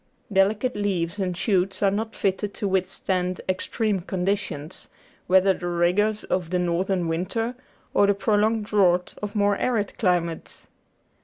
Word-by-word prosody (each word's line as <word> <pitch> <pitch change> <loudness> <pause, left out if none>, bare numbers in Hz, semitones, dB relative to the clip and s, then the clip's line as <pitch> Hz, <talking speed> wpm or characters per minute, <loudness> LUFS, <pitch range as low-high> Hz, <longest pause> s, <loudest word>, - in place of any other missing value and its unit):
Delicate 205 +6 +2
leaves 195 -2 -1
and 180 -2 -1
shoots 190 -1 +1
are 195 - +4
not 220 +3 -3
fitted 195 +1 -1
to 205 - -2
withstand 185 -1 -1
extreme 195 +2 -1
conditions, 180 -4 -3 0.4
whether 190 +1 +5
the 175 - -6
rigours 180 +5 +1
of 180 -3 -2
the 180 - 0
northern 180 +1 0
winter 185 +9 -2 0.4
or 205 - +4
the 200 - +3
prolonged 210 +2 +1
drought 185 -4 +2
of 210 0 -5
more 205 -1 +2
arid 220 -5 -1
climates. 175 -4 -1
195 Hz, 140 wpm, -24 LUFS, 180-205 Hz, 0.4 s, whether